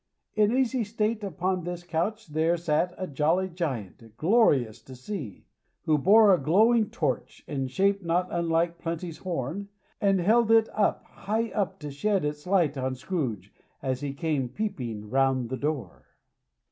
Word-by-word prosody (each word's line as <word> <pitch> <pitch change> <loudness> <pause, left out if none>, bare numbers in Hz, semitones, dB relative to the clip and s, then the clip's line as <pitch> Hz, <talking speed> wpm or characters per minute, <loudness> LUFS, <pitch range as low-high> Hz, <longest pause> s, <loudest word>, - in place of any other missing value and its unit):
In 215 +3 +3
easy 260 -2 +1
state 215 +1 -1
upon 185 -1 -2
this 175 0 -5
couch 175 +6 -2
there 160 +3 +1
sat 170 +2 0
a 185 - -3
jolly 160 +5 +1
Giant, 115 - -5
glorious 140 - +3
to 130 +3 -12
see; 130 - -7 0.4
who 155 -1 +3
bore 205 +6 +6
a 180 - +3
glowing 215 - +4
torch, 140 -6 -3
in 135 -2 -2
shape 195 +9 +1
not 175 +1 0
unlike 170 0 0
Plenty's 165 -1 -5
horn, 180 +3 -4 0.3
and 195 -2 +3
held 225 +5 +3
it 225 -1 +5
up, 210 -1 +1
high 225 +3 -3
up, 195 -3 -2
to 150 -1 -5
shed 195 +5 0
its 150 +2 -4
light 170 -7 +2
on 130 0 -2
Scrooge, 125 - -4 0.3
as 130 -1 -1
he 145 -1 -2
came 140 -3 -1
peeping 120 - -4
round 130 0 +1
the 130 - -2
door. 140 - -4
170 Hz, 160 wpm, -27 LUFS, 135-200 Hz, 0.4 s, bore